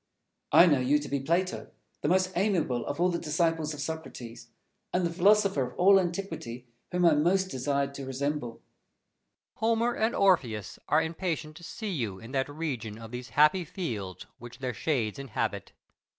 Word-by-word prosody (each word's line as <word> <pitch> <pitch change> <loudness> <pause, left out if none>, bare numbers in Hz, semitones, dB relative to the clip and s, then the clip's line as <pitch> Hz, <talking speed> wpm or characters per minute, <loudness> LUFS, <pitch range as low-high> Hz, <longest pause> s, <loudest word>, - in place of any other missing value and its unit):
Fenelon. 175 - +8
I - - +7
know 140 - +2
you 140 +4 +4
to 145 - -5
be 140 - -1
Plato, 170 +7 -1 0.3
the - - 0
most 185 +1 +2
amiable 175 - 0
of 145 - -3
all 180 +1 +4
the 170 -1 -1
disciples 160 0 0
of - - -11
Socrates, 130 -8 -6 0.4
and 180 0 +1
the 170 - -1
philosopher 200 -2 +4
of - - -18
all 195 +2 +6
antiquity 165 -9 -4 0.3
whom 180 -1 +2
I 165 - +7
most 185 +6 +2
desired 140 +1 -1
to 140 -1 -7
resemble. 135 -2 -2
Plato. - - -22 1.0
Homer 230 +2 +2
and 220 +2 +1
Orpheus 125 - +1
are 155 +2 +3
impatient 160 -2 -3
to 170 - -13
see 215 +4 -5
you 115 - -2
in 115 +5 -11
that 135 0 0
region 135 -9 -4
of 115 0 -10
these 125 +1 -6
happy 155 +5 +5
fields 120 - -5
which 120 0 -10
their 130 -2 -3
shades 115 -1 -1
inhabit. 135 -5 -3
155 Hz, 180 wpm, -29 LUFS, 130-180 Hz, 1.0 s, Fenelon